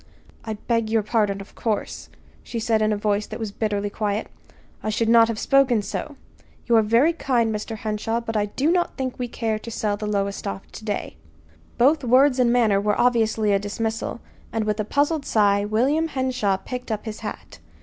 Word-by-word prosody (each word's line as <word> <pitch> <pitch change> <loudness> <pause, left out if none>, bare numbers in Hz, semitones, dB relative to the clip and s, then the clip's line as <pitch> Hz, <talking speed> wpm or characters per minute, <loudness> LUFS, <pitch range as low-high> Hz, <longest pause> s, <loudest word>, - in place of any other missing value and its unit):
"I 220 - -4
beg 230 +1 -1
your 220 -1 +2
pardon, 205 -2 0
of 195 - -13
course," 220 -3 -3 0.3
she 235 - -5
said 225 -1 +1
in 215 0 +2
a 210 - 0
voice 210 0 0
that - - -7
was 220 -3 -4
bitterly 205 -1 -2
quiet. 210 0 -2 0.5
"I 215 - -2
should 225 +1 0
not 230 -1 +7
have 230 -1 -3
spoken 255 -4 +3
so. 290 +8 -5 0.5
You 235 - +3
are - - +6
very 230 +10 +3
kind, 240 -8 +1
Mr. 215 +1 -4
Henshaw, 220 0 -2
but 225 -1 -5
I 210 -1 +1
do 275 +9 0
not 350 -1 0
think 260 -2 -3
we 250 - -2
care 225 -2 -2
to 230 - -8
sell 210 -2 -1
the 210 0 -4
Lowestoft 200 -1 -3
to 220 - -9
day." 205 -2 -3 0.6
Both 280 +4 +4
words 255 +2 +4
and 240 -2 +4
manner 220 -5 +3
were 210 0 0
obviously 220 -3 +2
a 200 - +3
dismissal; 225 +3 -3 0.3
and 225 -1 -1
with 210 0 -1
a 215 - 0
puzzled 290 +5 +1
sigh 205 -4 +2
William 265 +10 +1
Henshaw 255 -9 0
picked 250 +4 -6
up 215 0 -3
his 220 -1 -6
hat. 80 - -8
220 Hz, 200 wpm, -23 LUFS, 210-245 Hz, 0.6 s, not